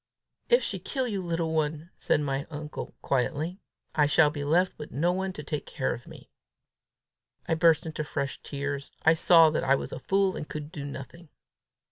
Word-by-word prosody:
"If 485 Hz, +1 st, +5 dB
she -, -, -2 dB
kill 260 Hz, -2 st, -2 dB
you, 200 Hz, -4 st, -2 dB
little 165 Hz, -2 st, -1 dB
one," 155 Hz, +2 st, -1 dB
said -, -, +1 dB
my 140 Hz, -1 st, -2 dB
uncle 150 Hz, -1 st, -6 dB
quietly, 150 Hz, +7 st, -1 dB, 0.3 s
"I 150 Hz, -2 st, +4 dB
shall 150 Hz, 0 st, +5 dB
be 145 Hz, -1 st, -4 dB
left 175 Hz, +6 st, +2 dB
with 150 Hz, -, -7 dB
nobody 180 Hz, +7 st, 0 dB
to 150 Hz, -, -7 dB
take 150 Hz, 0 st, -4 dB
care -, -, -1 dB
of -, -, -10 dB
me!" -, -, -13 dB, 1.2 s
I -, -, +2 dB
burst 165 Hz, -1 st, +4 dB
into 155 Hz, -1 st, -3 dB
fresh 140 Hz, -2 st, -3 dB
tears. 140 Hz, -1 st, -4 dB
I 160 Hz, -, +6 dB
saw 165 Hz, -1 st, +6 dB
that 155 Hz, -, 0 dB
I 135 Hz, +1 st, +4 dB
was -, -, -4 dB
a -, -, -5 dB
fool, 195 Hz, -1 st, +1 dB
and 150 Hz, -, -6 dB
could 150 Hz, 0 st, -6 dB
do 145 Hz, -3 st, -6 dB
nothing. 145 Hz, +4 st, -9 dB
155 Hz, 185 wpm, -28 LUFS, 145-170 Hz, 1.2 s, I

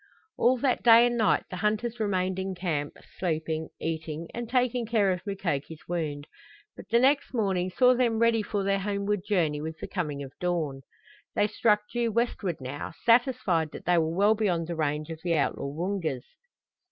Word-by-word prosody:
All 255 Hz, +2 st, +3 dB
that 255 Hz, 0 st, +1 dB
day 235 Hz, 0 st, +7 dB
and 240 Hz, 0 st, +1 dB
night 220 Hz, -3 st, +2 dB
the 185 Hz, -, -4 dB
hunters 215 Hz, +4 st, -1 dB
remained 190 Hz, -3 st, 0 dB
in 190 Hz, 0 st, -3 dB
camp, 155 Hz, -5 st, -3 dB, 0.2 s
sleeping, 160 Hz, -2 st, -2 dB
eating 160 Hz, 0 st, -4 dB
and 235 Hz, -1 st, -5 dB
taking 250 Hz, -2 st, +1 dB
care 210 Hz, -4 st, +2 dB
of 180 Hz, -1 st, -2 dB
Mukoki's 165 Hz, -6 st, -3 dB
wound, 155 Hz, -4 st, -3 dB, 0.5 s
but -, -, -12 dB
the 235 Hz, -, +4 dB
next 270 Hz, +2 st, +2 dB
morning 190 Hz, -5 st, 0 dB
saw 250 Hz, +7 st, +4 dB
them 240 Hz, -3 st, +1 dB
ready 230 Hz, 0 st, +3 dB
for 205 Hz, -1 st, -2 dB
their 195 Hz, 0 st, +1 dB
homeward 200 Hz, 0 st, -1 dB
journey 170 Hz, -8 st, 0 dB
with 160 Hz, +1 st, -5 dB
the -, -, -6 dB
coming 150 Hz, -7 st, -3 dB
of 135 Hz, -1 st, -10 dB
dawn. 160 Hz, -7 st, -1 dB, 0.5 s
They 205 Hz, -, +3 dB
struck 210 Hz, 0 st, +2 dB
due 235 Hz, 0 st, -1 dB
westward 215 Hz, -7 st, -1 dB
now, 135 Hz, +4 st, -6 dB
satisfied 230 Hz, -, +3 dB
that -, -, -9 dB
they 175 Hz, -1 st, +4 dB
were 160 Hz, 0 st, -1 dB
well 205 Hz, +3 st, +4 dB
beyond 190 Hz, -6 st, 0 dB
the 170 Hz, +1 st, -4 dB
range 155 Hz, 0 st, -2 dB
of 160 Hz, -, -6 dB
the 170 Hz, -2 st, +1 dB
outlaw 140 Hz, -2 st, 0 dB
Woongas. 160 Hz, -3 st, -3 dB
190 Hz, 180 wpm, -27 LUFS, 160-225 Hz, 0.5 s, day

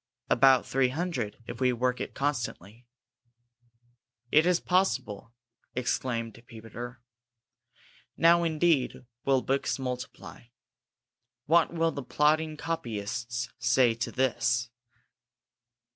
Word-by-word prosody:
"About 130 Hz, 0 st, +5 dB
three 135 Hz, -1 st, +2 dB
hundred, 140 Hz, -, -3 dB
if -, -, -7 dB
we 130 Hz, -1 st, +4 dB
work 125 Hz, +1 st, -1 dB
it -, -, -5 dB
constantly." 120 Hz, -5 st, -3 dB, 1.4 s
"Is 170 Hz, +3 st, +5 dB
it -, -, -15 dB
possible!" 180 Hz, -, 0 dB, 0.4 s
exclaimed 120 Hz, -2 st, -2 dB
Peter. 120 Hz, +2 st, -9 dB, 1.1 s
"Now 170 Hz, +1 st, +5 dB
indeed 160 Hz, -6 st, +1 dB, 0.2 s
will 135 Hz, -2 st, +3 dB
books 135 Hz, +1 st, 0 dB
multiply. 125 Hz, -2 st, -6 dB, 1.0 s
What 165 Hz, +3 st, +4 dB
will 165 Hz, -1 st, +1 dB
the 140 Hz, -, -5 dB
plodding 155 Hz, +3 st, +1 dB
copyists 120 Hz, -5 st, -4 dB
say 120 Hz, 0 st, +3 dB
to 115 Hz, +2 st, -4 dB
this?" 120 Hz, -2 st, 0 dB
125 Hz, 100 wpm, -28 LUFS, 120-155 Hz, 1.4 s, About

